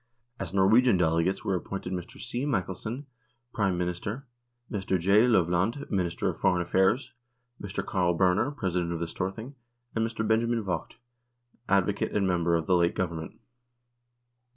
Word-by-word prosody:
As - - -4
Norwegian 100 +4 +5
delegates 85 +2 +1
were 95 - +1
ap 90 - -4
pointed 95 -1 -5
Mr. 90 -2 -6
C. 120 +2 -3
Michelsen, 115 +1 -2 0.5
Prime 95 -4 +1
Minister, 90 +9 -3 0.5
Mr. 95 -3 -1
J. 100 +7 +5
Lovland, 95 - +1
Minister 90 -5 0
of - - -2
Foreign 90 -1 +2
Affairs, 95 +9 +1 0.5
Mr. 100 0 -4
Carl 90 -3 +1
Berner, 95 +7 +3
President 90 -11 -2
of 85 - -3
the 85 - -1
Storthing, 95 +10 -5 0.4
and 110 - 0
Mr. 110 -1 -2
Benjamin 115 +1 +1
Vogt, 95 -3 -3 0.7
Advocate 100 +1 +1
and 100 -2 +1
member 85 -2 +2
of 80 -1 0
the 90 - +3
late 85 -1 +2
Govern 85 -3 -2
ment. 80 - -9
95 Hz, 150 wpm, -28 LUFS, 90-110 Hz, 0.7 s, Norwegian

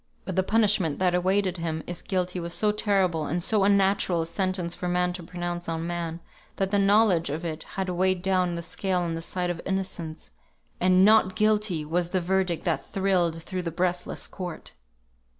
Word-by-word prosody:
But 190 - -4
the 190 - +4
punishment 200 -6 +2
that 180 -1 +2
awaited 185 +1 +1
him, 160 -2 -3
if 175 -1 -7
guilty, 180 -1 -1
was 170 0 -4
so 210 -1 +2
terrible, 190 -7 +1
and 175 +3 -1
so 210 0 +2
unnatural 195 -3 +3
a - - -5
sentence 180 0 -1
for 180 0 -4
man 180 0 +1
to 180 - -6
pronounce 175 0 -5
on 165 0 -2
man, 170 -1 -4 0.3
that 195 0 -1
the 205 - +3
knowledge 200 -4 +4
of 155 +5 -4
it 160 -1 -4
had 190 -1 -1
weighed 185 0 +1
down 185 -2 +1
the 170 - -5
scale 185 +1 -1
on 170 -1 -2
the 165 - -4
side 180 +1 -2
of 170 - -5
innocence, 185 -4 -4 0.5
and 185 +1 +5
"Not 210 -3 +5
Guilty" 210 -7 +1
was 170 +2 0
the 185 - +1
verdict 180 -1 0
that 170 -3 -1
thrilled 180 -4 +1
through 185 +1 -4
the 170 - -3
breathless 180 +1 -2
court. 180 -3 -7
180 Hz, 190 wpm, -26 LUFS, 170-190 Hz, 0.5 s, and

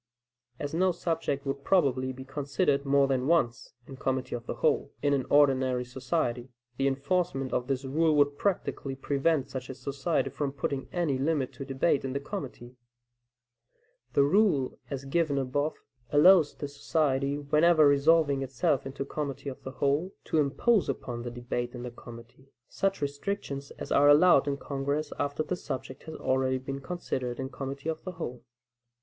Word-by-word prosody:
As 145 +2 -5
no 185 +3 +3
subject 160 -5 -2
would 140 0 -3
probably 135 -8 +2
be 130 +1 -9
considered 140 +1 0
more 140 0 +4
than 130 -1 0
once 150 -9 +1
in 135 - -10
committee 130 0 -2
of 120 -1 -5
the - - -3
whole, - - +1
in 145 -1 +3
an 135 -3 0
ordinary 130 -3 +3
society, 125 -1 -2 0.3
the 135 - +2
enforcement 135 0 -1
of 125 - 0
this 135 0 -1
rule 155 +3 +2
would 145 -1 +3
practically 145 -6 -2
prevent 140 +1 0
such 130 -1 -6
a 130 - -6
society 135 +2 -1
from 140 0 -3
putting 140 -1 -3
any 165 -7 0
limit 140 -2 0
to 135 - -7
debate 135 +2 +1
in 135 -1 -3
the 140 - -1
committee. 135 -7 -7 1.4
The 140 - +5
rule 150 -5 +2
as 140 -1 -5
given 145 0 +1
above, 145 +3 -1 0.3
allows 155 +2 +6
the 145 - -5
society, 140 -1 0
whenever 155 +2 +4
resolving 145 0 +4
itself 135 +1 0
into 135 0 -5
committee 140 -2 -4
of 130 - -9
the - - -6
whole, 140 +7 0
to 160 - 0
impose 180 - +2
upon 120 -1 -4
the 120 - -4
debate 120 0 -4
in 120 - -6
the 125 - -5
committee, 120 +2 -13 0.2
such 195 -4 -1
restrictions 140 -1 -3
as - - -7
are 145 +1 +5
allowed 145 -2 +6
in 140 -1 0
Congress 140 +2 -2
after 145 +2 -1
the 180 - -2
subject 130 -6 -6
has 160 - -7
already 130 0 +1
been 135 +1 -6
considered 130 -6 -4
in 130 0 -3
committee 140 +2 -6
of 160 -1 -4
the 185 - -5
whole. 125 -7 -6
140 Hz, 170 wpm, -29 LUFS, 130-155 Hz, 1.4 s, allows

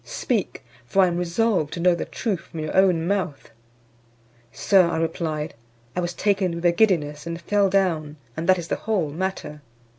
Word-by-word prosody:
Speak, - - -3 0.2
for 195 +9 +4
I - - +5
am 170 - -2
resolved 180 -2 0
to - - -5
know 180 +1 +4
the 170 - -3
truth 205 -7 -2
from 165 -1 -8
your 155 - -4
own 185 -4 +4
mouth." 175 - -2 1.0
"Sir," 190 - +4
I 170 - -1
replied, 160 -1 -2 0.4
"I - - 0
was 175 0 -2
taken 195 -4 +1
with 170 +1 -5
a 175 - +6
giddiness, 170 -6 +1
and 170 0 -4
fell 200 +3 +2
down, 165 -6 0 0.2
and 165 +3 -3
that 185 - +6
is 175 -1 -6
the - - 0
whole 190 -9 -1
matter." 170 -3 -4
175 Hz, 185 wpm, -23 LUFS, 160-190 Hz, 1.0 s, a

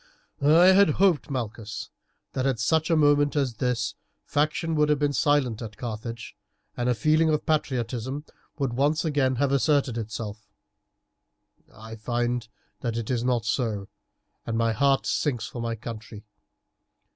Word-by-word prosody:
"I 160 +6 +6
had 200 -1 +6
hoped, 185 -7 +3
Malchus, 110 -4 -5 0.4
that 130 0 0
at 130 -4 0
such 155 +9 +1
a 165 - +4
moment 145 -1 +3
as 135 -6 0
this 120 -3 -1 0.3
faction 155 +3 0
would 150 -1 +2
have 150 - +3
been 145 0 0
silent 140 -7 +1
at 110 -2 -7
Carthage, 115 -1 -6 0.4
and 120 0 -1
a 125 - +2
feeling 155 +5 +3
of 150 -1 0
patriotism 130 -2 -1 0.3
would 135 -5 -1
once 145 +6 +1
again 140 -4 +1
have 140 +2 +1
asserted 140 -2 +2
itself. 105 -1 -6 1.2
I 110 +1 -10
find 120 +1 -1 0.3
that 115 -1 -3
it 115 +1 -3
is 120 -2 0
not 125 -2 0
so, 110 -4 -1 0.5
and 115 -1 -3
my 115 0 +2
heart 135 +4 +2
sinks 125 -7 0
for 120 - -6
my 115 0 -2
country. 110 -1 -9
125 Hz, 150 wpm, -26 LUFS, 115-145 Hz, 1.2 s, I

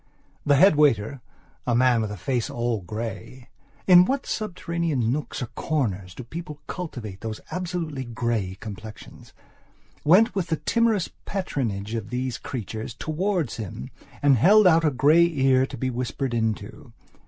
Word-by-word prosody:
The 145 - +5
head 170 +1 +6
waiter, 135 -3 +2 0.5
a 120 - +2
man 125 -1 +4
with 110 - -2
a 105 - -6
face 120 +6 -1
all 120 -3 -1
greyin 115 +6 -6 0.6
what 275 0 -1
subterranean 170 - -2
nooks 145 -1 -3
or - - -1
corners 100 - -2
do - - -7
people 150 +3 -8
cultivate 120 - -6
those 110 -1 -5
absolutely 170 -6 -3
grey 115 -5 -2
complexions?went 125 - -2
with 190 -3 -1
the 160 -1 0
timorous 230 -3 +1
patronage 115 - -3
of 110 -3 -4
these 125 -1 -3
creatures 110 -1 -6
towards 170 - -1
him 95 - -7 0.3
and 140 -3 +5
held 210 - +6
out 165 -2 +5
a 155 - +4
grey 150 +6 +5
ear 135 -2 +3
to - - -8
be 130 -1 -1
whispered 125 +1 -3
into. 110 -2 -3
130 Hz, 140 wpm, -25 LUFS, 110-165 Hz, 0.6 s, head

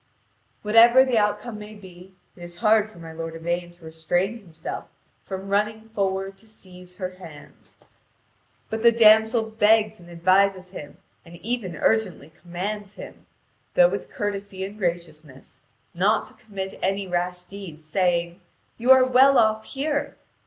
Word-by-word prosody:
Whatever 235 +4 +6
the 245 -4 +2
outcome 210 +2 -2
may 210 +1 -10
be, 185 -1 -14 0.2
it 175 - -16
is 175 0 -8
hard 215 +3 +3
for 215 - -18
my 165 -1 -10
lord 165 0 -6
Yvain 175 +1 -3
to 175 -1 -18
restrain 175 +7 -2
himself 165 -6 -8 0.4
from 190 0 -7
running 210 +2 -1
forward 195 -2 -2
to 220 - -16
seize 180 -4 -12
her 185 -1 -5
hands. 155 -5 -14 1.0
But 220 0 -3
the 235 0 +6
damsel 220 0 +5
begs 220 0 +2
and 175 0 -15
advises 185 +2 +2
him, 145 -6 -10 0.3
and 170 0 -14
even 200 -2 -4
urgently 185 -6 0
commands 200 +4 -5
him, - - -12 0.5
though - - +6
with - - -5
courtesy 200 -2 -4
and 200 +2 -9
graciousness, 160 -6 -5 0.3
not 200 +5 +1
to - - -13
commit 195 -5 -8
any 195 +1 -1
rash 180 0 -2
deed, 180 -5 -10
saying: 170 +2 -1 0.4
"You 240 +3 -2
are 260 -1 +8
well 260 +2 +5
off 220 -1 +2
here. 285 +1 -3
195 Hz, 150 wpm, -24 LUFS, 175-220 Hz, 1.0 s, are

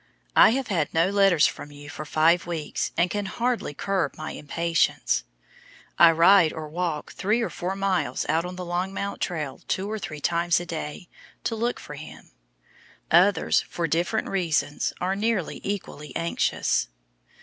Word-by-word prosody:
I - - +8
have 270 -4 -4
had 165 -7 0
no 170 +4 +3
letters 195 -6 +5
from 145 - -3
you 145 0 -12
for 155 +1 -7
five 165 +4 +3
weeks, 165 -3 -3
and 170 +2 +4
can 205 -1 -2
hardly 235 - -2
curb 190 -6 -1
my 155 - -5
impatience. 165 +3 0 0.8
I 170 - +9
ride 170 +1 +6
or 155 -1 -6
walk 165 -1 -3
three 210 +4 0
or 230 - -1
four 185 +2 -3
miles 195 -2 0
out 160 +2 +1
on 180 +1 -6
the 180 0 -6
Longmount 190 +3 -3
trail 150 -7 -3
two 195 +3 -2
or 220 - -3
three 150 -6 -6
times 170 +2 +2
a 175 - -6
day 160 +1 -6 0.4
to 225 - -1
look 235 +2 -1
for 150 - -9
him. 150 +2 -11 0.8
Others, 185 +4 +4
for 170 - -2
different 170 +7 0
reasons, 160 -6 0
are 185 +2 0
nearly 210 -4 -1
equally 190 -7 -5
anxious. 165 - 0
175 Hz, 160 wpm, -25 LUFS, 155-195 Hz, 0.8 s, I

